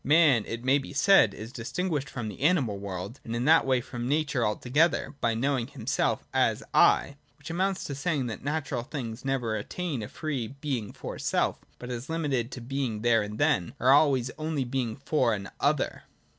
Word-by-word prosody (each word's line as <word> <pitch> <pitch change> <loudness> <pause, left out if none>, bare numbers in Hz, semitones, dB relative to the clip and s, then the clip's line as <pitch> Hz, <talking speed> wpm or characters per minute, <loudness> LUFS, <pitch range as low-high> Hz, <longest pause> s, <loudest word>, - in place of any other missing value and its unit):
Man, 145 -7 +5
it 115 +1 -5
may 135 +2 +4
be 135 - -8
said, 140 - +5
is 110 +3 -8
distinguished 145 +5 -2
from 120 -4 -5
the 105 +3 -8
animal 140 - +2
world, 100 +4 -6
and 115 - -4
in 120 +2 -1
that 160 -2 +5
way 130 -2 +3
from 120 0 -5
nature 145 -3 +1
altogether, 135 +12 +1
by 115 -1 +1
knowing 130 0 0
himself - - -1
as - - +2
' - - -37 0.2
I 140 - -6
': - - -37
which - - -8
amounts 190 +2 0
to 140 - -4
saying 140 -1 -1
that 115 -3 -5
natural 145 -4 -2
things 120 -3 -6
never 130 -5 -1
attain 140 - -3
a 105 - -5
free 140 -6 -3
Being 130 -8 -3
for - - -7
self, - - 0 0.2
but 125 0 -7
as 120 +3 -5
limited 145 -8 -1
to 125 - -7
Being 120 -3 -3
there 115 -2 +4
and 105 +1 -5
then, 90 -5 +1
are 130 +2 +4
always 135 -4 +4
and - - -20
only 155 -3 -1
Being 125 -3 -2
for 130 -4 +1
an 100 -2 -7
other. - - 0
130 Hz, 200 wpm, -28 LUFS, 115-145 Hz, 0.2 s, Man